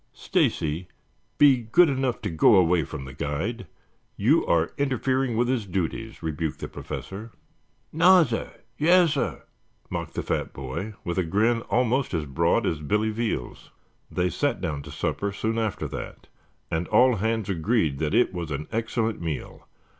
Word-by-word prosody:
"Stacy, 80 +4 0 0.5
be 140 -3 +7
good 120 +10 +4
enough 130 -4 -1
to 105 - -2
go 80 +7 +5
away 90 -2 +4
from 70 0 -7
the 65 - -9
guide. 85 - -3 0.5
You - - +3
are 85 -1 +2
interfering 130 -2 0
with 120 +1 +2
his 120 -5 -1
duties," 95 +4 -3
rebuked 80 -1 -2
the - - -5
Professor. 105 +4 -7 0.6
"Nassir. 165 -7 +4 0.3
Yassir," 165 -2 +3 0.5
mocked - - -4
the - - -2
fat - - -2
boy 70 +11 -5
with 85 +1 -2
a - - +2
grin 110 +7 +1
almost 125 -2 +1
as 80 -2 -1
broad 70 -2 +1
as 80 - -1
Billy 105 +8 0
Veal's. 110 - -3 0.4
They 90 0 0
sat 145 -4 0
down 75 -5 -3
to - - -11
supper 100 0 -2
soon 110 +3 -2
after 110 -3 -2
that - - -8 0.4
and 80 +1 -1
all 125 -2 +4
hands 110 +1 -1
agreed 85 - 0
that 75 -1 0
it 120 - +3
was 85 -3 -4
an 75 +1 -4
excellent 115 -1 -1
meal. 80 -3 -5
105 Hz, 155 wpm, -25 LUFS, 80-120 Hz, 0.6 s, be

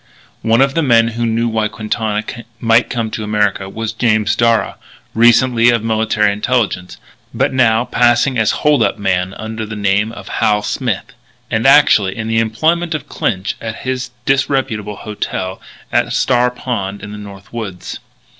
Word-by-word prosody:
One 115 +2 +3
of 135 0 +3
the 165 - +1
men 115 -5 +4
who 115 +1 -2
knew 115 +1 0
why 110 -2 0
Quintana 110 0 -2 0.4
might 115 +1 +3
come 115 -3 -2
to 110 - -4
America 105 -2 0
was 110 +2 -4
James 110 -2 +1
Darragh, 115 -1 +1 0.3
recently 120 +1 +4
of 115 -2 +2
the - - -3
Military 110 -2 +1
Intelligence, 105 -4 -1 0.4
but - - +1
now 120 -2 +3
passing 120 +2 +2
as 110 -3 +2
a - - -2
hold 150 -1 +2
up - - +1
man 95 -1 -1
under 110 +1 -5
the 110 0 -6
name 105 +1 +1
of 100 -4 -10
Hal 105 -1 +1
Smith, 120 +2 -3 0.4
and 115 +2 +1
actually 125 -9 +5
in 110 -1 -4
the 115 0 +1
employment 160 +9 0
of 155 - -6
Clinch 100 -2 -2
at 115 0 -6
his 130 -1 -2 0.2
disreputable 130 -6 0
"hotel" 100 -3 -5 0.3
at - - +1
Star 125 -1 +2
Pond 100 -6 -4
in 100 - -7
the 105 - -7
North 100 0 -12
Woods. 105 -6 -6
110 Hz, 170 wpm, -16 LUFS, 105-120 Hz, 0.4 s, actually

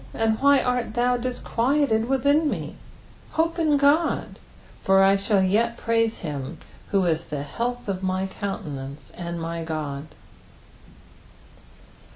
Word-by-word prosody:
and 220 -1 +1
why 280 0 +5
art 250 -3 -1
thou 245 +1 +2
disquieted 245 0 0
within 285 +3 +3
me? - - -4 0.6
hope 330 +1 0
in 305 -3 +3
God; 285 +4 +2 0.4
for 195 0 +4
I 195 +1 +5
shall 195 0 +2
yet 230 +5 +1
praise 230 -1 0
him, 140 -5 -5 0.3
who 195 -2 +2
is 165 -1 0
the 145 -2 -4
health 245 +10 -4
of 190 -2 -2
my 185 0 -1
countenance, 145 -8 -6
and 170 -1 -5
my 165 0 -4
God. 155 -2 -4
220 Hz, 130 wpm, -24 LUFS, 170-250 Hz, 0.6 s, why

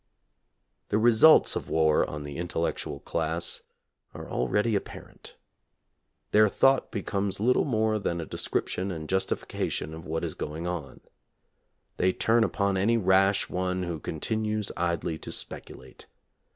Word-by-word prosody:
The 105 - +2
results 120 +7 +6
of - - -4
war 80 -1 +3
on 75 0 -6
the 75 0 -7
intellectual 85 -1 -3
class 80 +1 -2 0.5
are - - -8
already 105 +2 0
apparent. 100 - -7 1.0
Their 105 0 +5
thought 135 +5 +3
becomes 100 -2 -2
little 125 +4 +3
more 110 -5 +1
than 85 -4 -2
a 85 - -4
description 95 +4 -2
and 80 -4 -5
justification 95 -4 -2
of 80 +1 -9
what 80 +1 -2
is - - -2
going 80 +3 -5
on. 85 -7 -5 1.0
They 95 0 +2
turn 115 +1 +3
upon 100 -3 0
any 115 +5 +3
rash 95 -1 +3
one 90 0 -2
who 85 -3 -4
continues 110 +6 -2
idly 85 -2 -1
to - - -7
speculate. 65 0 -8
95 Hz, 135 wpm, -27 LUFS, 80-110 Hz, 1.0 s, results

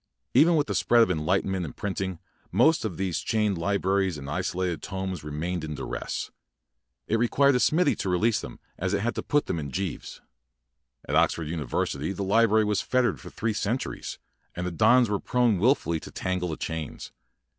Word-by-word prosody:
Even 170 +2 +6
with 150 -2 +2
the - - -3
spread 120 -1 +4
of 95 - +1
enlightenment 90 +3 0
and 80 - -7
printing, 95 -2 -3 0.3
most 160 0 +4
of 95 -7 -4
these 95 -3 -1
chained 105 -3 0
li 100 +4 +1
braries 95 -3 +1
and 70 -1 -8
isolated 90 +1 -2
tomes 95 -4 -4
remained 80 +3 -3
in 75 -1 -4
duress. - - -4 0.7
It 115 - 0
required 140 +4 +4
a 125 - +2
smithy 155 +3 +3
to 95 - -2
re 90 - +2
lease 110 +4 +2
them, - - -9 0.2
as - - 0
it - - -1
had 120 +2 0
to - - -3
put 145 0 +1
them 85 - -2
in 70 -2 -5
gyves. 95 +4 -4 0.9
At 75 - -3
Oxford 80 -1 +2
University 75 +1 -2
the 100 - -4
li 115 +4 +4
brary 110 0 +3
was 105 -1 +1
fettered 125 -1 +1
for - - -9
three 115 -1 -2
cen 105 +3 0
turies, - - -6 0.4
and 90 - -3
the 90 - -2
dons 120 +7 +5
were 105 -1 -1
prone 120 -6 +2
wil 125 +8 +5
fully 85 - -3
to - - -10
tangle 90 -1 -2
tiie 80 - -4
chains. 80 -2 -5
95 Hz, 200 wpm, -26 LUFS, 85-115 Hz, 0.9 s, Even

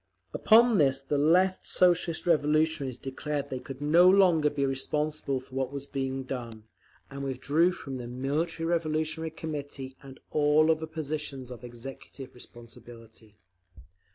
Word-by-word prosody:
Upon 230 -1 +5
this 135 -2 +3
the 140 +1 -2
Left 185 +5 +3
Socialist 175 -2 +1
Revolutionaries 155 -4 +1
declared 145 +2 -4
they 130 - -3
could 135 +1 -9
no 170 +5 +6
longer 180 -6 +4
be 140 -1 -1
responsible 140 +1 -2
for 130 +1 -18
what 130 0 -2
was 140 -1 -6
being 135 -1 -3
done, 120 -4 -7 0.5
and 140 0 -6
withdrew 140 +6 +1
from 135 -6 -7
the 120 -1 -7
Military 145 +7 -2
Revolutionary 160 -1 -1
Committee 145 -4 -6
and 135 -1 -12
all 155 +1 +4
other 160 0 -1
positions 150 -4 -5
of 125 0 -10
executive 130 +2 -10
responsibility. 115 -2 -14
145 Hz, 135 wpm, -28 LUFS, 130-160 Hz, 0.5 s, no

